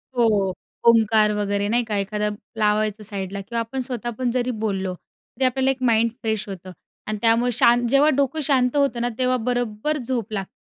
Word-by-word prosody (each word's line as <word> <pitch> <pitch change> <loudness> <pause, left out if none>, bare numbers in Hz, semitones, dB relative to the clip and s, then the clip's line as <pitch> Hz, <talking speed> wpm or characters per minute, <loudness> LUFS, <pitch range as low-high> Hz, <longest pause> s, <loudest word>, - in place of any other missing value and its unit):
हो, 210 -6 +2 0.3
ओंकार 220 -2 +5
वगैरे 205 -1 -1
नाही 240 +2 +2
का 220 -2 -3
एखादा 210 +1 -1 0.3
लावायचं 215 0 +1
साईडला 200 -1 -4
किंवा 230 +4 -4
आपण 230 +3 -4
स्वतःपण 240 0 -3
जरी 250 0 -1
बोललो 190 -3 -2
तरी 260 +7 -6
आपल्याला 265 +1 +2
एक 260 -1 -6
माइंड 230 0 +3
फ्रेश 220 -3 -2
होतं 185 -1 -8 0.4
आणि 215 0 -2
त्यामुळे 235 +2 +3
शां 240 +1 +4
जेव्हा 275 +5 +4
डोकं 280 +2 0
शांत 260 -2 +2
होतं 275 -4 +1
ना 240 - 0
तेव्हा 255 0 +2
बरोबर 245 +4 -1
झोप 240 -4 -3
लागते. 195 -2 -3
230 Hz, 175 wpm, -22 LUFS, 210-250 Hz, 0.4 s, ओंकार